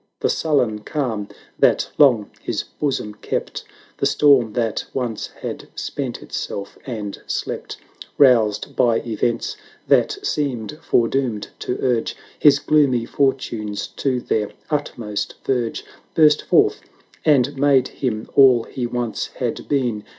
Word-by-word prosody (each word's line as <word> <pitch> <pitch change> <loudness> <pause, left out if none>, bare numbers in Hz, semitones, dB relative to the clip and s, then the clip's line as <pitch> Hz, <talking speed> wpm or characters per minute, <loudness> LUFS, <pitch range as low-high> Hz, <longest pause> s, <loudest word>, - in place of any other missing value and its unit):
The - - +2
sullen 130 -9 +1
calm 110 -4 -3 0.3
that - - +3
long 125 -8 +5
his - - -2
bosom 135 -7 -3
kept. 105 - -4 0.3
The - - +2
storm 135 -7 +4
that 115 -3 -1
once 120 -5 -2 0.2
had - - -5
spent - - -4
itself 100 0 -5
and 105 -5 -5
slept, - - -4 0.4
Roused 115 -7 +4
by 120 -3 +3
events 115 - -2 0.3
that 420 - +3
seemed 140 - -2
fore 120 -7 +2
doomed 125 -6 -2
to 125 - -3
urge 120 -3 0 0.2
His 145 -2 +6
gloomy 140 -6 +2
fortunes 115 -7 -1
to 130 -3 0
their 105 -3 -1 0.2
utmost 120 -8 -3
verge, 120 -4 -1
890 - - -23 0.3
Burst 150 -2 +5
forth, - - +4 0.4
and 145 -1 +3
made 135 -2 +3
him 110 -5 -3
all 130 -4 +6
he 125 0 -4
once 120 -2 -2
had - - -3
been. 125 -7 0
125 Hz, 130 wpm, -21 LUFS, 110-140 Hz, 0.4 s, His